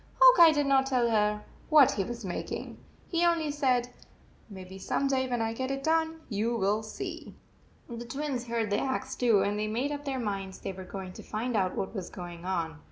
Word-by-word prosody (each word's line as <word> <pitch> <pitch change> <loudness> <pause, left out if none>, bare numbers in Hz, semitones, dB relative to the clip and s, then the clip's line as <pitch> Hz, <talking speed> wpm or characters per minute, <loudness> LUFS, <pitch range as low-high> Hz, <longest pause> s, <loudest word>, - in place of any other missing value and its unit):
Hawk - - +8
Eye 335 -2 +10
did 290 -2 +1
not 270 -1 +3
tell 245 -3 +2
her 210 -1 +1 0.3
what 300 -4 +7
he 195 - -1
was 235 +1 -6
making. 180 - -5 0.3
He 340 -1 0
only 335 -3 +2
said, 255 -4 +1 0.3
" - - -30
Maybe 190 -1 -9
some 275 - -1
day, 260 -1 0
when 240 -2 0
I 225 0 -1
get 260 +3 -3
it 275 0 -3
done, 320 +1 +1
you 225 +2 -1
will 210 0 +1
see." 220 - -7 0.5
The 235 -1 -6
Twins 265 -1 -3
heard 230 -3 -1
the 205 - +2
axe 265 0 -2
too, 225 -6 +3
and 205 +1 -1
they 215 - -1
made 245 +7 -1
up 290 0 -4
their 270 -1 -2
minds 195 -5 -3
they - - -5
were 190 0 -9
going 185 0 -7
to - - -10
find 230 +3 -3
out 190 -3 +1
what 190 - -3
was 190 -5 -5
going 175 -1 -8
on. 165 -5 -2
235 Hz, 220 wpm, -29 LUFS, 200-275 Hz, 0.5 s, Eye